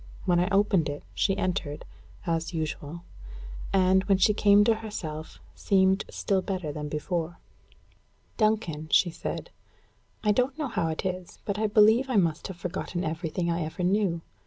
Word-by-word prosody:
When 175 Hz, -2 st, +3 dB
I 180 Hz, +2 st, +1 dB
opened 195 Hz, -5 st, +2 dB
it, 145 Hz, 0 st, -6 dB
she 195 Hz, -1 st, +1 dB
entered, 165 Hz, -5 st, -2 dB, 0.4 s
as 165 Hz, 0 st, -1 dB
usual; 160 Hz, +1 st, -4 dB, 0.7 s
and, 190 Hz, 0 st, +4 dB
when 195 Hz, -1 st, +3 dB
she 210 Hz, +3 st, +4 dB
came 205 Hz, 0 st, +5 dB
to 225 Hz, +1 st, +4 dB
herself, 160 Hz, -8 st, -6 dB
seemed 190 Hz, 0 st, +2 dB
still 195 Hz, -2 st, 0 dB
better 185 Hz, -6 st, -3 dB
than 150 Hz, 0 st, -5 dB
before. 165 Hz, +2 st, -3 dB, 1.0 s
"Duncan," 205 Hz, -9 st, 0 dB
she 175 Hz, -, +4 dB
said, -, -, -5 dB, 0.7 s
"I 210 Hz, -, +4 dB
don't 255 Hz, +6 st, +1 dB
know 300 Hz, -4 st, -2 dB
how 170 Hz, -7 st, -1 dB
it 160 Hz, +2 st, -3 dB
is, 185 Hz, -1 st, -4 dB
but 205 Hz, 0 st, -2 dB
I 220 Hz, -, +2 dB
believe 220 Hz, +5 st, +5 dB
I 255 Hz, -, 0 dB
must 170 Hz, -5 st, +1 dB
have 190 Hz, -3 st, -8 dB
forgotten 180 Hz, 0 st, -4 dB
everything 165 Hz, +2 st, -2 dB
I 170 Hz, +1 st, -1 dB
ever 160 Hz, +4 st, -4 dB
knew. 185 Hz, -2 st, +1 dB
185 Hz, 160 wpm, -27 LUFS, 165-205 Hz, 1.0 s, came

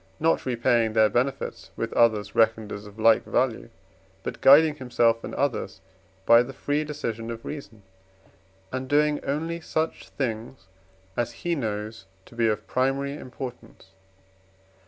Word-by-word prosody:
not 165 Hz, -3 st, +1 dB
repaying 120 Hz, -2 st, +2 dB
their 110 Hz, -1 st, +5 dB
benefits 130 Hz, +5 st, -2 dB
with -, -, -3 dB
others 105 Hz, -3 st, +2 dB
reckoned 110 Hz, -1 st, +2 dB
as 105 Hz, +1 st, -7 dB
of 105 Hz, +1 st, -14 dB
like 115 Hz, 0 st, +5 dB
value, 120 Hz, -3 st, -1 dB, 0.5 s
but -, -, -6 dB
guiding 150 Hz, +3 st, +7 dB
himself 120 Hz, -3 st, +1 dB
and -, -, -6 dB
others 120 Hz, -8 st, -2 dB, 0.5 s
by 115 Hz, 0 st, +7 dB
the 130 Hz, +2 st, -5 dB
free 145 Hz, +1 st, -1 dB
decision 115 Hz, -7 st, -4 dB
of 115 Hz, -1 st, -7 dB
reason, 110 Hz, -8 st, -8 dB, 0.9 s
and 130 Hz, 0 st, -4 dB
doing 150 Hz, +1 st, +2 dB
only 165 Hz, +4 st, -2 dB
such 160 Hz, 0 st, -3 dB
things 115 Hz, -3 st, -4 dB, 0.5 s
as 120 Hz, -, -1 dB
he 175 Hz, -, +2 dB
knows 110 Hz, -, -4 dB, 0.2 s
to -, -, -17 dB
be 115 Hz, -1 st, +1 dB
of 105 Hz, -1 st, -1 dB
primary 135 Hz, +2 st, 0 dB
importance. 125 Hz, -7 st, -9 dB
120 Hz, 140 wpm, -25 LUFS, 110-140 Hz, 0.9 s, guiding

